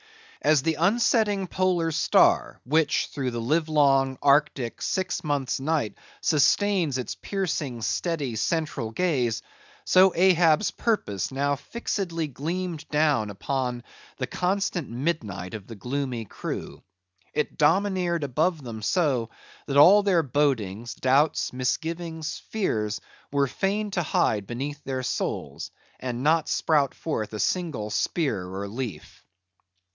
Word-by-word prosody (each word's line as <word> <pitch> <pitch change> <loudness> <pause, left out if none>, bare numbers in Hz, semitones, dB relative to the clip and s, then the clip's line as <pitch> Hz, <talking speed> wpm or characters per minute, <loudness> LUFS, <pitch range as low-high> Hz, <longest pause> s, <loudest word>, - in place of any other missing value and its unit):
As 150 -4 +3
the 160 - +2
unsetting 205 +1 +2
polar 180 -3 0
star, - - +3
which 150 +3 +2
through 135 -3 -1
the 120 -1 -4
livelong, 140 -1 +2
arctic, 140 -5 +2
six 185 -2 -1
months' 145 -4 -1
night 140 -7 0 0.3
sustains 165 0 +2
its 125 - -3
piercing, 155 - -3
steady, 120 - -1
central 155 -3 -1
gaze; 125 -5 0 0.4
so 185 +1 +6
Ahab's 175 -1 +4
purpose 120 - -1
now 140 +1 0
fixedly 175 - -3
gleamed 165 +4 -4
down 150 -8 +2
upon 125 +3 -3 0.3
the 130 - -1
constant 180 +1 -1
midnight 115 - -3
of 105 -4 -7
the 115 - -8
gloomy 125 +1 -3
crew. - - -6 0.5
It 150 - -2
domineered 175 +1 +2
above 155 +4 0
them 115 -3 -7
so, 125 - +1 0.4
that 140 -1 0
all 190 +8 +8
their 185 -5 +3
bodings, 120 -6 -1
doubts, 135 +3 +2
misgivings, 160 +5 -3
fears, 110 - -1 0.3
were 140 0 +2
fain 200 +9 -1
to 185 - 0
hide 105 - +1
beneath 140 +4 -5
their 130 -1 -3
souls, - - -3 0.3
and 125 -1 -4
not 160 +1 +3
sprout 145 -4 +2
forth 110 -10 -3
a 105 - -4
single 150 - -1
spear 110 - -1
or 95 +2 -5
leaf. 115 +1 -7
145 Hz, 125 wpm, -26 LUFS, 125-170 Hz, 0.5 s, all